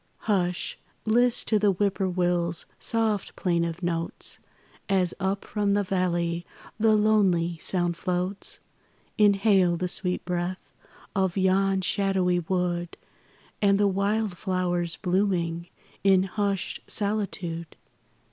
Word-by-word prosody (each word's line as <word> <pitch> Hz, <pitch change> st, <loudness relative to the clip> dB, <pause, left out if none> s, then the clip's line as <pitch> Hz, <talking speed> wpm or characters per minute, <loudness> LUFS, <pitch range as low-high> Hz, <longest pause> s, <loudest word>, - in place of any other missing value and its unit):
Hush! 180 Hz, -4 st, -1 dB, 0.3 s
list 240 Hz, +2 st, +2 dB
to 215 Hz, -, +3 dB
the 205 Hz, 0 st, +3 dB
Whip 200 Hz, +1 st, 0 dB
poor 190 Hz, -1 st, +1 dB
will's 175 Hz, -2 st, +1 dB
soft 220 Hz, -3 st, -1 dB
plaintive 170 Hz, -1 st, -1 dB
notes, 170 Hz, -1 st, -3 dB, 0.5 s
As 185 Hz, -3 st, +2 dB
up 195 Hz, +1 st, -1 dB
from 205 Hz, -2 st, 0 dB
the 205 Hz, -, +2 dB
valley 175 Hz, -3 st, 0 dB, 0.4 s
the 220 Hz, 0 st, +4 dB
lonely 190 Hz, -6 st, +2 dB
sound 175 Hz, -1 st, 0 dB
floats, 180 Hz, +3 st, -2 dB, 0.6 s
Inhale 195 Hz, -4 st, +4 dB
the 180 Hz, -, -1 dB
sweet 180 Hz, 0 st, -2 dB
breath 180 Hz, +1 st, -3 dB, 0.4 s
of 190 Hz, -1 st, +1 dB
yon 190 Hz, 0 st, +2 dB
shadowy 185 Hz, -2 st, +1 dB
wood 175 Hz, 0 st, -2 dB, 0.6 s
And 200 Hz, -1 st, +4 dB
the 205 Hz, -, +4 dB
wild 200 Hz, 0 st, 0 dB
flowers 175 Hz, -3 st, -1 dB
blooming 180 Hz, -3 st, 0 dB, 0.4 s
in 190 Hz, -1 st, +5 dB
hushed 200 Hz, 0 st, -2 dB
solitude. 190 Hz, -6 st, -2 dB
185 Hz, 115 wpm, -26 LUFS, 175-200 Hz, 0.6 s, in